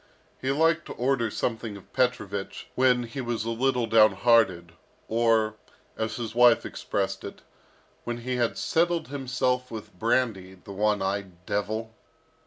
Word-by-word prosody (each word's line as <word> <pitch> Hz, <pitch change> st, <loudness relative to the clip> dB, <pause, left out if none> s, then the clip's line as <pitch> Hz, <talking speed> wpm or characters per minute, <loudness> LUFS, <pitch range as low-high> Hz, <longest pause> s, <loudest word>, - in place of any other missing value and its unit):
He 130 Hz, -, -1 dB
liked 160 Hz, +3 st, +2 dB
to -, -, -6 dB
order 125 Hz, -2 st, 0 dB
something 115 Hz, -1 st, -3 dB
of 100 Hz, -, -17 dB
Petrovich 100 Hz, -6 st, -1 dB
when 125 Hz, -1 st, +3 dB
he 120 Hz, +3 st, -6 dB
was 120 Hz, -2 st, -2 dB
a 115 Hz, -, -1 dB
little 125 Hz, +1 st, +1 dB
downhearted, 110 Hz, -5 st, +4 dB, 0.4 s
or, 110 Hz, -1 st, +2 dB, 0.4 s
as 110 Hz, 0 st, -3 dB
his 115 Hz, -2 st, -5 dB
wife 120 Hz, 0 st, +5 dB
expressed -, -, -3 dB
it, -, -, -9 dB, 0.6 s
"when 120 Hz, 0 st, -3 dB
he 125 Hz, +1 st, -2 dB
had 120 Hz, -2 st, 0 dB
settled 170 Hz, -2 st, +1 dB
himself 125 Hz, -2 st, -1 dB
with 110 Hz, -2 st, -8 dB
brandy, 105 Hz, -3 st, 0 dB
the 95 Hz, +2 st, -11 dB
one 105 Hz, 0 st, +1 dB
eyed 95 Hz, -2 st, -4 dB
devil!" 110 Hz, +2 st, -2 dB
115 Hz, 145 wpm, -27 LUFS, 105-125 Hz, 0.6 s, wife